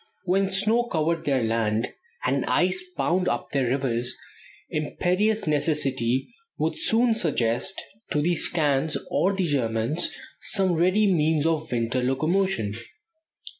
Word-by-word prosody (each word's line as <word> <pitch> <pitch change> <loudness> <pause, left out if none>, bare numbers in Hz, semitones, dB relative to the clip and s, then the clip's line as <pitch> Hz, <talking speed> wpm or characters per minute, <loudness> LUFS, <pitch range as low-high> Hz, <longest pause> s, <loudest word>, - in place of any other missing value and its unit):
When 190 +2 +1
snow 215 +5 +1
covered 165 -5 -1
their 135 -4 +1
land, 115 0 0 0.4
and - - +1
ice 360 - +1
bound 180 +1 +1
up - - -2
their 135 -3 +1
rivers 125 -2 +1 0.5
imperious 185 +8 0
necessity 140 - 0 0.2
would 160 +1 -1
soon 230 +1 +3
suggest 155 - 0 0.3
to 150 - 0
the 170 +4 +2
Scands 150 -3 0
or 190 - +2
the 190 -2 -1
Germans 130 +1 0 0.3
some 190 -3 +3
ready 185 +6 +3
means 160 -5 +2
of 160 -1 -1
winter 120 +1 0
locomotion. 145 - 0
155 Hz, 125 wpm, -25 LUFS, 130-190 Hz, 0.5 s, soon